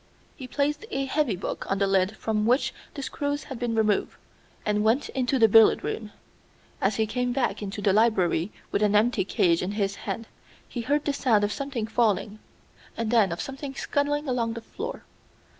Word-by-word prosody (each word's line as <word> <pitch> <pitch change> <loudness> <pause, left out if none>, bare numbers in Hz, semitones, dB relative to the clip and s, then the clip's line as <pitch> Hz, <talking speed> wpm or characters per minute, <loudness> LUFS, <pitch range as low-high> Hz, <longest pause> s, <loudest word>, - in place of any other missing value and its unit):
He 260 -5 -8
placed 290 - -1
a 270 0 -1
heavy 270 -6 0
book 180 - -5
on 195 - +1
the 200 - +2
lid 195 +2 +1
from 215 -1 0
which 250 +4 +2 0.2
the 280 - -5
screws 285 +2 -2
had 265 -4 -8
been 240 -2 -1
removed, 215 -2 +1 0.5
and 210 0 +1
went 230 +6 +2
into 265 0 0
the 225 -3 +6
billiard 220 +1 +6
room. 215 -2 -4 0.7
As 195 +1 +2
he 220 - +1
came 250 +2 -1
back 265 -3 0
into 205 0 -5
the 195 - +3
library 195 -5 +2 0.2
with - - 0
an 210 0 +3
empty 220 0 +3
cage 170 -2 +2
in 185 +3 -2
his 200 -2 0
hand 230 - -4 0.4
he 240 - -4
heard 285 +5 0
the 290 - +1
sound 230 -7 +2
of 205 - +1
something 275 -5 -3
falling, 215 -2 0 0.6
and 230 -1 -1
then 220 -6 +4
of 170 - -3
something 270 0 -6
scuttling 290 +2 -1
along 235 -3 0
the 230 - -6
floor. - - -7
225 Hz, 190 wpm, -26 LUFS, 205-265 Hz, 0.7 s, the